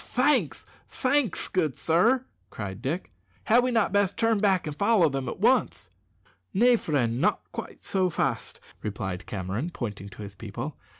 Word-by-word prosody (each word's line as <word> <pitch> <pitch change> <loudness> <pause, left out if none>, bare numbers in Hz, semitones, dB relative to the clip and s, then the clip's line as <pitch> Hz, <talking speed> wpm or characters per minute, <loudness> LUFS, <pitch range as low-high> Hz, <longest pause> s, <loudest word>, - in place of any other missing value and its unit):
"Thanks, 275 +5 +1 0.2
thanks, 260 - +1
good 155 -8 0
sir," 230 +11 +2 0.2
cried 100 -1 -6
Dick. 150 +8 -3 0.3
"Had 235 +3 +5
we 255 - +1
not 225 -5 +1
best 200 -2 +2
turn 225 -2 +2
back 195 -3 +2
and 150 -2 -4
follow 200 -3 +4
them 135 -2 -3
at - - -6
once?" - - +2 0.6
"Nay, 240 +4 +6
friend, 130 - 0
not - - +2
quite - - -7
so 190 -2 +1
fast," 160 - -2 0.2
replied 95 -3 -4
Cameron, 100 - -3
pointing 105 - -6
to 105 - -10
his 100 -1 -8
people. 115 +8 -6
160 Hz, 160 wpm, -27 LUFS, -, 0.6 s, Nay